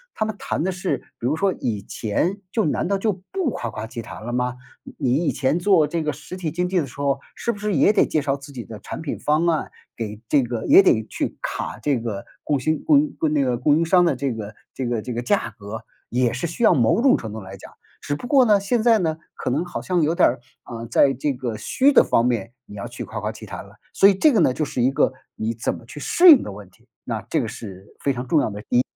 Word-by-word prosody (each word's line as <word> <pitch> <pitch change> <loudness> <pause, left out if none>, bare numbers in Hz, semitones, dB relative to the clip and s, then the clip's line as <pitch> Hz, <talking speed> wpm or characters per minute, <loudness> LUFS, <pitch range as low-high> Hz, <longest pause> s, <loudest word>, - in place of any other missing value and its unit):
他 215 - 0
们 215 -1 -4
谈 - - -2
的 190 - 0
是 185 0 -2 0.2
比 120 - -2
如 150 - +1
说 195 +3 +1
以 105 -5 -3
前 160 - -2
就 220 - +1
难 150 - 0
道 200 +1 +1
就 210 +2 0 0.2
不 375 -9 -1
夸 120 - -4
夸 110 0 -6
其 115 +1 -7
谈 110 -1 -10
了 120 - -4
吗？ 125 0 -1 0.3
你 - - -13
你 125 -1 +1
以 - - +3
前 135 +5 0
做 175 -4 +4
这 165 +3 -2
个 155 -1 -1
实 150 +5 -9
体 175 -4 -3
经 180 +4 -1
济 185 0 +1
的 150 - -2
时 125 - -14
候， 140 -1 +1 0.2
是 235 - -1
不 205 - -8
是 210 -2 -1
也 155 +9 +4
得 - - +3
介 155 - +1
绍 140 -1 0
自 140 0 -11
己 125 -4 -7
的 110 -2 -9
产 - - -7
品 150 - -4
方 150 +3 +1
案， 165 -2 0 0.2
给 105 -2 -5
这 140 +4 +4
个 120 -2 -4
也 - - +8
得 110 - +3
去 - - -4
卡 - - -4
这 140 -4 0
个 110 -4 -5 0.2
供 145 -2 0
新 155 +4 -1
供 300 -3 +5
应 295 0 -2 0.2
那 145 -2 +2
个 125 -2 0
供 145 +3 +3
应 165 - +1
商 180 +1 +4
的 165 - +2
这 135 0 -2
个 105 -1 -7 0.2
这 130 - -3
个 120 -3 -2
这 125 - -4
个 120 - -2
价 120 -2 0
格， 105 +2 -7 0.3
也 120 -1 +1
是 130 +8 -2
需 170 +8 -4
要， - - +7
某 120 - +3
种 275 - +6
程 110 - -5
度 110 - -6
来 95 0 -9
讲。 - - -13 0.3
只 145 - -2
不 245 - -7
过 270 -3 +5
呢， 210 -3 +5
现 220 +4 0
在 230 -2 +5
呢， 160 -4 -1 0.2
可 - - -3
能 145 +7 0
好 175 - -5
像 180 -2 0
有 155 +2 +2
点 - - +5
儿， 120 - -4 0.2
啊， 115 -1 -7
在 135 +4 +3
这 135 +3 -1
个 125 -3 -4
虚 260 - +2
的 275 - +7
方 115 - +2
面， 120 -2 -1
你 105 - -12
要 100 - -5
去 - - -7
夸 - - -6
夸 - - -3
其 - - -11
谈 - - -7
了。 - - -17 0.2
所 195 - +6
以 200 - +6
这 305 +11 +4
个 225 - +3
呢 130 - +4
就 155 - -2
是 130 -4 -2
一 130 - +3
个 135 0 +2 0.2
你 110 +1 -2
怎 115 - -2
么 - - -12
去 135 - -10
适 355 - +5
应 300 - +9
的 - - -6
问 100 -1 -11
题， 90 - -28 0.2
那 - - -3
这 - - -1
个 - - -3
是 95 -2 -9
非 140 - 0
常 125 0 -5
重 155 +4 +3
要 140 - 0
的 105 +1 -8
一 120 - +4
140 Hz, 300 characters per minute, -22 LUFS, 115-180 Hz, 0.3 s, 应